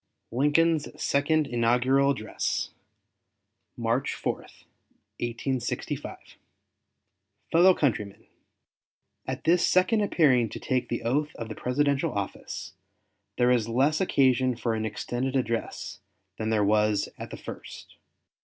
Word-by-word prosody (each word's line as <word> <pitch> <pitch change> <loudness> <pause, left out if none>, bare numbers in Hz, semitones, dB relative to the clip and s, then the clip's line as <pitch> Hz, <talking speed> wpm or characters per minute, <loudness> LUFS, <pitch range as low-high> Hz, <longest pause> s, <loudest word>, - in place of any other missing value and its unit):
LINCOLN'S 150 +5 +2
SECOND 150 +2 +2
INAUGURAL 125 +3 +2
ADDRESS 110 -6 -2 1.1
MARCH 120 +4 0
4, - - -1
1865 120 +1 -6 1.3
FELLOW 180 +3 +6
COUNTRYMEN: 105 -8 -1 1.0
At - - -4
this 170 +2 +4
second 185 +4 +3
appearing 140 - +3
to - - -7
take 125 -2 -1
the 120 - -3
oath 145 +6 0
of 115 -1 -6
the 110 - -6
Presidential 140 +4 0
office, 100 -1 -5 0.6
there 125 0 +4
is 115 -3 +2
less 140 +8 +2
occasion 130 -7 +3
for 115 0 -1
an 110 0 -1
extended 125 +5 -3
address 115 -3 -2 0.4
than 110 0 -1
there 105 -2 +2
was 105 0 +2
at - - -6
the - - -7
first. - - -10
125 Hz, 115 wpm, -27 LUFS, 115-145 Hz, 1.3 s, FELLOW